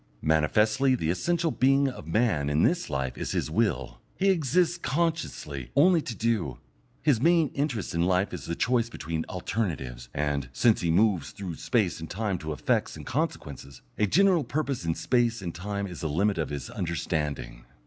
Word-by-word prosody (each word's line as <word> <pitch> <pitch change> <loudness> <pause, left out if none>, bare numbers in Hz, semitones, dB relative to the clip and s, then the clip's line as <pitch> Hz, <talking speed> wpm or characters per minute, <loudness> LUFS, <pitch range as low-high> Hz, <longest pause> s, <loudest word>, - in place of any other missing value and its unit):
Manifestly 105 - +3
the 80 -9 0
essential 170 - 0
being 135 +2 +3
of 125 - -6
man 85 -7 +1
in 75 +2 +2
this 175 0 +1
life 65 -3 -3
is - - -3
his - - -1
will; - - -1
he 195 +1 +2
exists 175 +1 +1
consciously 150 - -2
only 170 +3 +5
to 115 - -6
do; 110 - -1 0.5
his 140 -7 +3
main 165 -1 +4
interest 140 -8 -2
in 85 - 0
life 95 +3 +1
is - - -6
the 85 - -3
choice 120 +2 +1
between 80 -6 -4
alternatives; 75 - -3
and, 70 -3 -1
since 115 - +3
he 85 - 0
moves 95 -3 +2
through 95 -4 -6
space 105 -10 0
and 80 - -7
time 100 -2 -2
to 80 -1 -5
effects 75 -5 0
and - - -9
consequences, 70 -2 -4 0.2
a 105 - +3
general 180 - +4
purpose 135 - -2
in 80 -1 0
space 120 -2 +1
and 90 -4 -5
time 100 +3 -3
is 90 -3 -7
the 80 - -2
limit 95 +5 +1
of 80 - -1
his 70 -1 -5
understanding. 75 -8 -3
100 Hz, 180 wpm, -27 LUFS, 80-130 Hz, 0.5 s, only